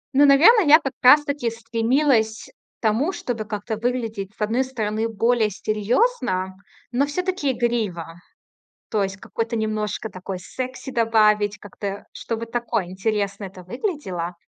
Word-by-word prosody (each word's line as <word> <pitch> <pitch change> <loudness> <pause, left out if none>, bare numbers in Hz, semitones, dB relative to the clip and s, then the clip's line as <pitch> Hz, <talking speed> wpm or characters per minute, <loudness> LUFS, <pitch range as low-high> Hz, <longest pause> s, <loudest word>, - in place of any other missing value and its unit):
Ну, 285 +2 +7
наверно, 340 - +7
я 310 -1 +7
как 270 -3 -4
раз-таки 285 -1 +5
стремилась 230 0 +1 0.3
к - - -74
тому, 235 - +1
чтобы 240 -10 -4
как-то 210 +1 -4
выглядеть, 225 -4 -3
с - - -15
одной 225 +5 +1
стороны, 225 -3 -2
более 225 0 +2
серьёзно, 210 - 0 0.4
но 265 +4 +1
всё-таки 360 -2 -1
игриво. 210 -9 -2 0.7
То 215 -2 +1
есть 195 0 -3
какой-то 230 +4 -4
немножко 215 0 -2
такой 185 0 -6
секси 255 +8 -6
добавить, 215 -3 +2
как-то, 200 0 -6
чтобы 230 0 -4
такое 230 -3 -2
интересно 200 +1 -2
это 185 -1 -9
выглядело. 185 - -4
225 Hz, 130 wpm, -23 LUFS, 205-255 Hz, 0.7 s, Ну